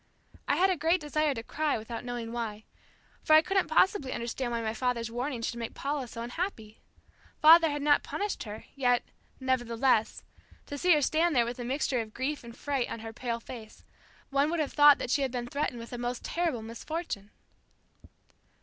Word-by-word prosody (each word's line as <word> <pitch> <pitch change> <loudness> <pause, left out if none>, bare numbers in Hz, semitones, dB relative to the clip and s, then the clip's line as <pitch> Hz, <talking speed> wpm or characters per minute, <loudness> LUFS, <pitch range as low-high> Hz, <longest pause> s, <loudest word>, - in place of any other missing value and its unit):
I - - +3
had 380 +1 +4
a - - +2
great 330 +5 +2
desire 300 -1 0
to 225 - -5
cry 305 +4 -1
without 225 +1 -6
knowing 240 -2 -5
why, 220 -3 -4 0.6
for 310 - +3
I 310 +1 +8
couldn't 385 +1 +1
possibly 315 -3 +2
understand 240 +1 -3
why 230 -1 -2
my 220 0 -1
father's 235 -1 -1
warning 245 0 -3
should 235 - -3
make 230 - -5
Paula 280 -2 -2
so 230 +1 -7
unhappy. 235 - -5 0.6
Father 325 +1 +8
had 290 -1 -3
not 290 -1 +4
punished 410 0 -3
her, 210 0 -8
yet, 245 -3 +2 0.4
nevertheless, 250 -3 +1 0.4
to 285 - -6
see 360 +3 +5
her 295 - +1
stand 320 +3 +2
there 240 -2 +4
with 240 +1 -5
a - - -3
mixture 255 0 0
of 215 -1 -9
grief 285 +2 -2
and 235 0 -11
fright 275 -4 -1
on 230 - -5
her 225 0 -7
pale 235 0 -3
face, 230 -2 -11 0.5
one 280 +2 +2
would 340 0 -1
have 300 - -1
thought 290 -1 +8
that - - -4
she 280 - +2
had 265 -2 0
been 245 -1 -3
threatened 280 0 -2
with 230 +1 -9
a 240 - -4
most 245 0 -3
terrible 330 -10 -1
misfortune. 230 - -5
255 Hz, 195 wpm, -29 LUFS, 235-300 Hz, 0.6 s, I